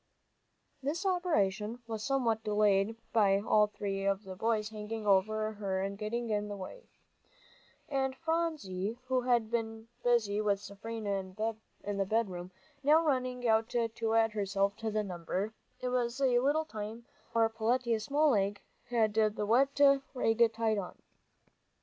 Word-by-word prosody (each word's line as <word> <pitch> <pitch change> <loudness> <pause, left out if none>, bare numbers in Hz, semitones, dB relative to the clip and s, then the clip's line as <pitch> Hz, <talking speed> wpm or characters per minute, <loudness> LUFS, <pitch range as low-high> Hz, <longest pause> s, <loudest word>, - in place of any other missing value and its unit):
This 310 +8 -2
operation 240 - 0
was 220 -2 -5
somewhat 240 -5 +1
delayed 210 0 +2 0.2
by 200 -4 +4
all 210 0 +3
three 195 -2 -4
of 195 +1 0
the 190 -2 -8
boys 215 +1 0
hanging 215 0 -6
over 215 +2 +2
her 195 -3 -2
and 195 0 -3
getting 225 +3 -3
in 210 0 0
the 205 -1 -5
way. 340 - -9 1.0
And 265 -1 -1
Phronsie, 285 - -2
who 255 0 +1
had 240 -3 +1
been 225 -1 -3
busy 215 -4 +2
with 205 -2 +1
Seraphina 200 -2 -5 0.5
in 205 0 -3
the 195 - +1
bedroom, 190 -4 -1 0.3
now 310 +4 +4
running 255 -3 0
out 220 +1 +3
to 230 -1 -1
add 225 -1 +4
herself 200 -1 0
to 225 - -3
the 215 0 0
number, 185 +3 -3 0.3
it 250 - -1
was 250 0 -1
a 255 -3 +4
little 290 +5 +2
time 220 -2 -7 0.2
before 230 -1 +2
Peletiah's 230 0 0
small 295 +1 +3
leg 205 -2 +1 0.3
had 225 -3 +2
the 215 -1 +1
wet 270 +6 +3 0.4
rag 230 -2 +3
tied 220 -2 +1
on. 180 - -7
220 Hz, 150 wpm, -32 LUFS, 205-245 Hz, 1.0 s, by